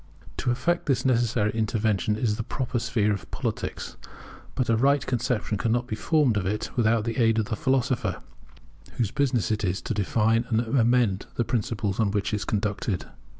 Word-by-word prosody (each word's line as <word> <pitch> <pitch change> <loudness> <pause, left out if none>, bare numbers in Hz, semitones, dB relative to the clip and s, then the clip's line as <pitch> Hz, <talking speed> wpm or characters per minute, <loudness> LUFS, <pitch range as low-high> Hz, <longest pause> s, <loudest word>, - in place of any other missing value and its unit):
To - - -1
effect 170 +9 0
this 130 -2 +1
necessary 115 -4 +2
intervention 110 -2 0
is 110 -1 0
the 115 - -3
proper 125 +1 -2
sphere 110 -3 +1
of 95 -4 -6
politics. - - -4 0.6
But 125 - 0
a 115 - +3
right 140 +4 +3
conception 120 -4 -1
cannot 120 +3 +1
be 110 - -4
formed 140 -3 +2
of 95 - -1
it 105 +2 -2
without 115 -2 +2
the 115 0 -3
aid 115 -2 +3
of 110 - +1
the 110 - -3
philosopher, 130 +1 0 0.7
whose 115 -4 -1
business 130 -7 +1
it 110 0 -1
is 90 0 0
to - - -2
define 110 +3 +1
and 110 - +2
amend 120 -4 +2
the 120 - 0
principles 110 -3 -1
on 110 -3 +3
which 105 +1 -1
it - - +2
is 100 - -5
conducted. 105 -2 -1
115 Hz, 185 wpm, -26 LUFS, 105-125 Hz, 0.7 s, a